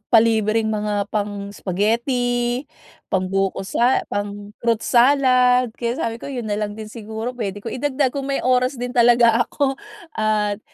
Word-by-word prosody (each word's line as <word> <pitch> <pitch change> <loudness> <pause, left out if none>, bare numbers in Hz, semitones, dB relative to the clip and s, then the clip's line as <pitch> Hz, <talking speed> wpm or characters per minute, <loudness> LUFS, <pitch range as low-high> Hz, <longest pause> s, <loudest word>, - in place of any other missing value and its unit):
palibreng 220 -1 +3
mga 210 -1 -1
pang-spaghetti, 230 +5 -1 0.4
pangbuko 195 +1 -1
sa 240 +6 +1
pang-fruit 205 +3 -2
salad. 250 -1 +4
Kaya 235 +1 -3
sabi 230 -3 -2
ko - - -7
yun 250 -4 -4
nalang 205 0 -2
din 215 -1 -7
siguro 220 +2 -6
pwede 205 -3 -4
ko - - -3
idagdag 270 0 0
kung 275 -1 -4
may 275 - 0
oras 255 +1 +2
din 245 0 -3
talaga 235 -1 +5
ako. 275 -2 -1 0.4
At 210 -1 0
230 Hz, 135 wpm, -21 LUFS, 210-250 Hz, 0.4 s, talaga